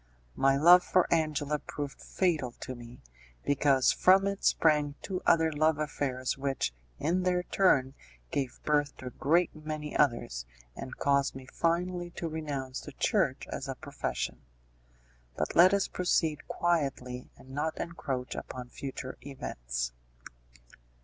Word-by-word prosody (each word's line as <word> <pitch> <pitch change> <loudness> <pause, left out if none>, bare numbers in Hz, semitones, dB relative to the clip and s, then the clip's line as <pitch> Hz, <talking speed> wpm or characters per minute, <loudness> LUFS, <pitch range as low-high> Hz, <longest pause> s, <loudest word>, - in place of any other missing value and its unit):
My 135 0 +3
love 175 +5 +8
for 185 -2 +3
Angela 150 -2 0
proved 145 -1 -6
fatal 155 -10 0
to 130 - -5
me, 120 0 -12 0.4
because 140 -2 +4
from 190 +1 +5
it 200 0 -2
sprang 150 -3 +3
two 185 -2 -3
other 160 -1 +5
love 155 0 +2
affairs 135 -4 -2
which, 135 - -1 0.2
in 170 +5 +1
their 180 -1 +1
turn, 135 -10 +3 0.4
gave 135 -3 -2
birth 145 -1 +1
to - - -10
a - - -3
great 170 +7 +2
many 155 -1 -5
others, 120 - +1 0.3
and 130 - -7
caused 140 -1 +2
me 135 -1 -8
finally 175 +1 0
to 170 - -3
renounce 145 -5 -4
the 145 - -10
Church 165 - +1
as 140 - -4
a 135 - -3
profession. 140 0 -4 1.0
But 75 - -2
let 180 +2 +8
us 200 -1 +2
proceed 160 -4 0
quietly, 135 -7 -1
and 130 - -15
not 150 +3 -2
encroach 135 -7 -3
upon 125 -1 -7
future 130 -1 -6
events. - - -4
145 Hz, 140 wpm, -30 LUFS, 130-165 Hz, 1.0 s, love